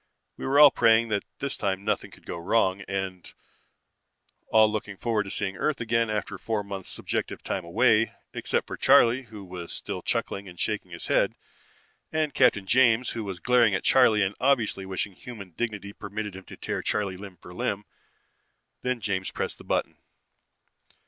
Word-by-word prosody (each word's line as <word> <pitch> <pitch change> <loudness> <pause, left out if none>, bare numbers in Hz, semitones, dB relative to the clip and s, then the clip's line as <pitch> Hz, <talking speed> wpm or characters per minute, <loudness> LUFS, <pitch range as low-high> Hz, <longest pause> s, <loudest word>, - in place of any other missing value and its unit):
We - - -5
were 140 +2 +4
all 150 -2 +10
praying 115 0 +4
that 100 -2 -1
this 140 -1 -2
time 95 -1 -1
nothing 105 -2 -1
would - - -22
go - - -5
wrong, 95 +1 +2
and 95 -2 -4 1.2
all 110 -1 +6
looking 105 -2 -4
forward 110 -2 0
to - - -7
seeing 95 -2 -2
Earth 155 -3 0
again 115 0 +1
after 105 -3 -3
four 110 -2 -2
months 100 -2 -7
subjective - - -3
time 95 - -2
away, 110 +5 +3 0.2
except - - -1
for - - -6
Charley, 120 +3 +5
who 105 -3 -10
was 90 -2 -7
still - - -5
chuckling 100 -1 -2
and 90 -1 -13
shaking 105 -4 -1
his 85 -1 -8
head, - - +2 0.8
and 155 -2 0
Captain 120 -7 +4
James 120 +2 +4
who 115 - -4
was 95 -3 -5
glaring 120 -3 +4
at - - -2
Charley 110 -6 +5
and 95 +1 0
obviously 115 -7 +1
wishing 95 +1 -3
human 105 -3 -10
dignity 105 +1 -4
permitted 105 -1 -5
him 95 - -10
to - - -11
tear - - -3
Charley 100 -3 -1
limb 95 -1 -10
from 90 +2 -12
limb. 100 +1 -2 1.0
Then 125 -2 -1
James 95 -3 -1
pressed - - -4
the - - -11
button. - - -1
105 Hz, 175 wpm, -27 LUFS, 95-115 Hz, 1.2 s, all